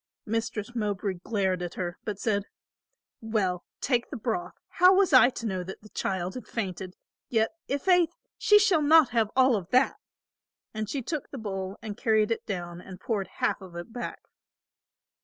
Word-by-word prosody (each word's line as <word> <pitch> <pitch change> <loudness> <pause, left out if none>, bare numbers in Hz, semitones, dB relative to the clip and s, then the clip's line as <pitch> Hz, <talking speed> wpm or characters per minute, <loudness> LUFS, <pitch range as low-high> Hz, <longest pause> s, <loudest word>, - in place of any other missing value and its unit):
Mistress 225 0 -3
Mowbray 205 -4 -2
glared 190 -5 0
at 175 -1 -5
her, 175 -1 -4
but 210 -2 -3
said, 205 -1 0 0.8
"Well, 200 -6 -1 0.2
take 245 -3 +1
the 280 - -5
broth; 350 - -3
how 365 +1 +5
was 380 -5 +3
I 255 -1 +8
to 235 - -7
know 190 -4 -2
the 190 +2 -7 0.2
child 185 -1 -2
had 250 - -8
fainted? 190 -4 -4 0.3
Yet 225 -2 +2 0.2
i' 280 - +1
faith 355 +2 +4 0.3
she 420 - +5
shall 400 -6 +4
not 310 -1 +6
have 225 -2 +1
all 260 -1 +5
of 190 -4 -4
that," 255 +4 +3 0.8
and 215 -1 -3
she 270 +1 -3
took 300 +3 -4
the 275 - -7
bowl 195 -3 -4
and 210 -2 -5
carried 220 -1 +2
it 230 - -1
down 175 -3 -4
and 185 0 -11
poured 200 -2 -2
half 190 - -1
of 185 -2 -11
it 175 +6 -7
back. 245 0 -6
220 Hz, 175 wpm, -28 LUFS, 190-255 Hz, 0.8 s, I